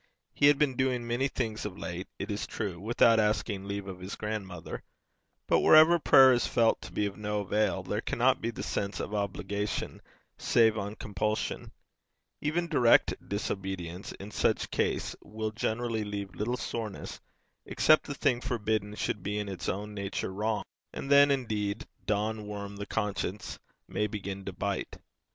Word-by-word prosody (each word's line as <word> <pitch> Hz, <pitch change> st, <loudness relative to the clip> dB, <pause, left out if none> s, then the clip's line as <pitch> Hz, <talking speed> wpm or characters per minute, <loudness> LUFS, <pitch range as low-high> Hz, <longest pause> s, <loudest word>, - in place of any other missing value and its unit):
He 145 Hz, -, +4 dB
had 145 Hz, -1 st, +6 dB
been 140 Hz, -3 st, +2 dB
doing 125 Hz, -2 st, 0 dB
many 120 Hz, +3 st, +1 dB
things 115 Hz, -5 st, -3 dB
of 100 Hz, -3 st, -5 dB
late, 90 Hz, +1 st, -5 dB
it 100 Hz, +2 st, -4 dB
is 100 Hz, -, -3 dB
true, 100 Hz, -6 st, -4 dB
without 115 Hz, +2 st, +4 dB
asking 105 Hz, -2 st, 0 dB
leave 100 Hz, 0 st, -3 dB
of 95 Hz, -1 st, -7 dB
his 95 Hz, +2 st, -6 dB
grandmother, 100 Hz, -5 st, -5 dB, 0.6 s
but -, -, +3 dB
wherever 160 Hz, +2 st, +7 dB
prayer 130 Hz, -4 st, +7 dB
is 120 Hz, -, +1 dB
felt 115 Hz, -1 st, +3 dB
to -, -, -9 dB
be 105 Hz, -, 0 dB
of 100 Hz, -1 st, -4 dB
no 105 Hz, 0 st, -2 dB
avail, 100 Hz, -1 st, 0 dB
there 105 Hz, +4 st, -2 dB
cannot 130 Hz, +3 st, +2 dB
be 115 Hz, -, -1 dB
the 115 Hz, -, -5 dB
sense 100 Hz, 0 st, -2 dB
of 105 Hz, -, -4 dB
obligation 100 Hz, 0 st, -2 dB, 0.4 s
save 110 Hz, -2 st, +4 dB
on 105 Hz, 0 st, -4 dB
compulsion. 105 Hz, +1 st, -2 dB, 0.7 s
Even 165 Hz, +3 st, 0 dB
direct 125 Hz, -8 st, +5 dB, 0.2 s
disobedience 95 Hz, -3 st, -4 dB
in 100 Hz, +2 st, -9 dB
such -, -, +1 dB
case -, -, 0 dB
will 110 Hz, 0 st, -4 dB
generally 110 Hz, 0 st, -1 dB
leave 100 Hz, -2 st, -5 dB
little 120 Hz, +6 st, -2 dB
soreness, 110 Hz, -6 st, -5 dB, 0.5 s
except 155 Hz, -, +4 dB
the 145 Hz, -, -4 dB
thing 130 Hz, -4 st, +1 dB
forbidden 110 Hz, -4 st, -1 dB
should 105 Hz, -, -2 dB
be 105 Hz, +3 st, -2 dB
in 105 Hz, -1 st, -2 dB
its 95 Hz, -3 st, -4 dB
own 105 Hz, +2 st, -3 dB
nature 100 Hz, -1 st, -3 dB
wrong, 105 Hz, +2 st, -1 dB, 0.3 s
and 135 Hz, -, -5 dB
then, 140 Hz, 0 st, +8 dB
indeed, 110 Hz, -7 st, -1 dB, 0.2 s
'Don 105 Hz, +1 st, -1 dB
Worm, 100 Hz, -1 st, -6 dB
the 100 Hz, -, -5 dB
conscience,' 105 Hz, -1 st, -3 dB, 0.3 s
may 105 Hz, -, 0 dB
begin 100 Hz, -2 st, -5 dB
to 95 Hz, -, -3 dB
bite. 100 Hz, +1 st, -3 dB
105 Hz, 165 wpm, -30 LUFS, 100-115 Hz, 0.7 s, then